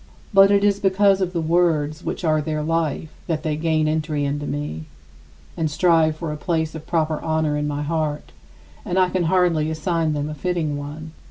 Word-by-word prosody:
But 195 Hz, 0 st, +7 dB
it 200 Hz, 0 st, +3 dB
is 200 Hz, -1 st, +3 dB
because 195 Hz, 0 st, +3 dB
of 180 Hz, -1 st, 0 dB
the 170 Hz, -2 st, -2 dB
words 160 Hz, -2 st, +1 dB
which -, -, -4 dB
are 155 Hz, -2 st, +2 dB
their 155 Hz, 0 st, -2 dB
life 160 Hz, -1 st, -1 dB, 0.2 s
that 155 Hz, -2 st, -2 dB
they 155 Hz, -1 st, -1 dB
gain 155 Hz, 0 st, +1 dB
entry 155 Hz, -2 st, -1 dB
into 145 Hz, +1 st, -2 dB
me 80 Hz, -, -4 dB, 0.7 s
and 160 Hz, -2 st, -1 dB
strive 160 Hz, 0 st, +3 dB
for 160 Hz, -1 st, -4 dB
a -, -, -6 dB
place 160 Hz, -1 st, -1 dB
of 160 Hz, 0 st, -9 dB
proper 160 Hz, -2 st, 0 dB
honor 160 Hz, -2 st, 0 dB
in 150 Hz, 0 st, -1 dB
my 145 Hz, 0 st, -2 dB
heart; 150 Hz, -1 st, -2 dB, 0.5 s
and 180 Hz, -, -2 dB
I 185 Hz, -1 st, +4 dB
can 180 Hz, -1 st, 0 dB
hardly 165 Hz, -3 st, +2 dB
assign 160 Hz, 0 st, -1 dB
them 145 Hz, 0 st, -2 dB
a 155 Hz, -, -5 dB
fitting 160 Hz, -1 st, -2 dB
one. 150 Hz, +2 st, -7 dB
160 Hz, 195 wpm, -22 LUFS, 150-175 Hz, 0.7 s, But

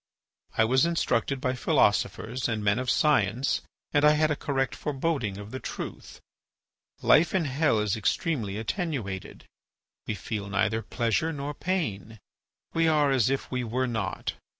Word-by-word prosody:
I 110 Hz, -, +5 dB
was 130 Hz, +7 st, +3 dB
instructed 140 Hz, -5 st, 0 dB
by 130 Hz, -1 st, 0 dB
philosophers 125 Hz, 0 st, +1 dB
and 110 Hz, -2 st, -2 dB
men 105 Hz, +3 st, +2 dB
of 130 Hz, 0 st, -2 dB
science 125 Hz, -4 st, +2 dB, 0.3 s
and 145 Hz, -, +3 dB
I 150 Hz, 0 st, +7 dB
had 155 Hz, 0 st, +2 dB
a -, -, +2 dB
correct 135 Hz, -2 st, -1 dB
foreboding 135 Hz, -8 st, -2 dB
of 105 Hz, +1 st, -9 dB
the 130 Hz, -, -5 dB
truth. -, -, -7 dB, 0.8 s
Life 170 Hz, +4 st, +5 dB
in 175 Hz, -4 st, +2 dB
hell 140 Hz, -2 st, +2 dB
is 105 Hz, -2 st, +1 dB
extremely 110 Hz, -, -1 dB
attenuated; 115 Hz, -, -4 dB, 0.6 s
we 105 Hz, -, -1 dB
feel 100 Hz, -1 st, -5 dB
neither 110 Hz, +2 st, +1 dB
pleasure 120 Hz, +9 st, 0 dB
nor 145 Hz, -1 st, -4 dB
pain; 125 Hz, -, -3 dB, 0.6 s
we 165 Hz, 0 st, +3 dB
are 150 Hz, -3 st, +3 dB
as 130 Hz, -3 st, +3 dB
if 135 Hz, 0 st, -2 dB
we 125 Hz, -1 st, -1 dB
were 125 Hz, +3 st, -1 dB
not. 110 Hz, -6 st, -3 dB
130 Hz, 150 wpm, -27 LUFS, 110-150 Hz, 0.8 s, I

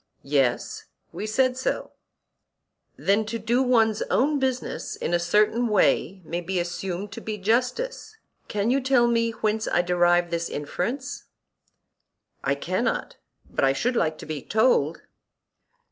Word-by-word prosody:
Yes, 135 Hz, -3 st, 0 dB, 0.3 s
we 215 Hz, -, -5 dB
said 255 Hz, +3 st, +2 dB
so. 260 Hz, -, -2 dB, 1.1 s
Then 200 Hz, +2 st, +2 dB
to 230 Hz, +1 st, -2 dB
do 230 Hz, +4 st, +1 dB
one's 225 Hz, -4 st, +3 dB
own 290 Hz, +3 st, +2 dB
business 260 Hz, -1 st, -2 dB
in -, -, -3 dB
a 175 Hz, -, +3 dB
certain 210 Hz, +7 st, +2 dB
way 195 Hz, -2 st, +2 dB
may 170 Hz, +2 st, -3 dB
be 185 Hz, +1 st, -2 dB
assumed 180 Hz, +3 st, -4 dB
to -, -, -7 dB
be 215 Hz, -1 st, -4 dB
justice. 255 Hz, -, -1 dB, 0.3 s
Can 210 Hz, +3 st, 0 dB
you 275 Hz, +1 st, +2 dB
tell 260 Hz, -2 st, +4 dB
me 230 Hz, -1 st, +2 dB
whence 220 Hz, -1 st, -1 dB
I 175 Hz, -, +2 dB
derive 175 Hz, 0 st, +3 dB
this 170 Hz, 0 st, -1 dB
inference? 245 Hz, -, -4 dB, 1.2 s
I -, -, +1 dB
cannot, -, -, -2 dB, 0.3 s
but -, -, -2 dB
I 135 Hz, 0 st, +4 dB
should 245 Hz, -, 0 dB
like 155 Hz, -7 st, +1 dB
to -, -, -9 dB
be 155 Hz, -2 st, -4 dB
told. 210 Hz, -, +2 dB
215 Hz, 145 wpm, -25 LUFS, 175-245 Hz, 1.2 s, tell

